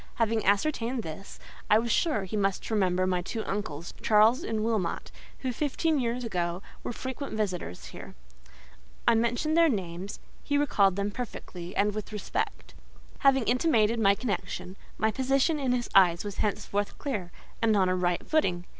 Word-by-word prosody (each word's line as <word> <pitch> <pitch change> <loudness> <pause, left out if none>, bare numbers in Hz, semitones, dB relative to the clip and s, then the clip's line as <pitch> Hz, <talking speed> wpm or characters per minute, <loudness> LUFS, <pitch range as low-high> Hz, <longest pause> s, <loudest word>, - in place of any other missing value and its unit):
Having 225 -1 +1
ascertained 230 +3 +1
this, 160 +5 -8 0.3
I 210 - +7
was 230 +1 0
sure 300 - +2
he 190 +3 -5
must 195 +1 -1
remember 185 -3 +2
my 180 -1 +1
two 220 +5 -4
uncles, 170 -5 -4
Charles 220 +7 +4
and 220 - -2
Wilmot, 220 -6 -1 0.3
who, 255 -2 -2
fifteen, 300 +3 0
years 245 0 -1
ago, 175 -4 -2 0.2
were - - -4
frequent 260 +1 -5
visitors 185 - -3
here. - - -10 0.9
I - - +7
mentioned 235 +7 +1
their 335 -1 +6
names; 190 - -4 0.2
he 285 - +1
recalled 200 -10 +3
them 200 +1 -1
perfectly, 190 -6 -7
and 205 +1 +2
with 215 +1 -5
respect. 210 -1 -4 0.5
Having 270 -2 +4
intimated 235 -2 +2
my 200 -2 +5
connection, 200 -4 -4 0.2
my 220 0 +2
position 270 +5 +1
in 265 -3 0
his 245 -1 0
eyes 175 -3 +5
was 205 -1 -5
henceforth 205 -1 -1
clear, 205 -11 -4 0.3
and 220 -2 +3
on 190 -2 +3
a 185 - +2
right 175 -1 0
footing. 180 - +1
215 Hz, 165 wpm, -28 LUFS, 190-250 Hz, 0.9 s, I